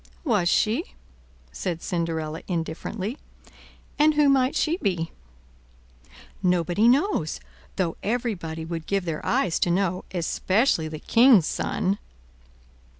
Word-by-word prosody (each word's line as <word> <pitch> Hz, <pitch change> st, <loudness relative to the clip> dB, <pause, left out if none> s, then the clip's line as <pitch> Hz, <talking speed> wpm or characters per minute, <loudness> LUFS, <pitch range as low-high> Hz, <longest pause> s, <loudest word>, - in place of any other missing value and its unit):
"Was 210 Hz, -, +2 dB
she?" 230 Hz, -, +1 dB, 0.6 s
said 175 Hz, -3 st, -4 dB
Cinderella 165 Hz, -3 st, -2 dB
indifferently; 185 Hz, -, -4 dB, 0.8 s
"and 305 Hz, +1 st, +5 dB
who 295 Hz, -1 st, +4 dB
might 265 Hz, -1 st, +3 dB
she 330 Hz, +2 st, +1 dB
be?" 175 Hz, -, -1 dB, 1.3 s
"Nobody 180 Hz, +3 st, +2 dB
knows, 255 Hz, -, +2 dB, 0.4 s
though 175 Hz, -4 st, -1 dB
everybody 195 Hz, -9 st, -3 dB
would 165 Hz, -1 st, -5 dB
give 195 Hz, -2 st, 0 dB
their 160 Hz, -3 st, -3 dB
eyes 235 Hz, -10 st, +1 dB
to -, -, +1 dB
know, 185 Hz, 0 st, 0 dB
especially 185 Hz, +1 st, +1 dB
the 155 Hz, 0 st, -6 dB
king's 230 Hz, -, +5 dB
Son." 195 Hz, +4 st, -1 dB
185 Hz, 110 wpm, -25 LUFS, 165-240 Hz, 1.3 s, and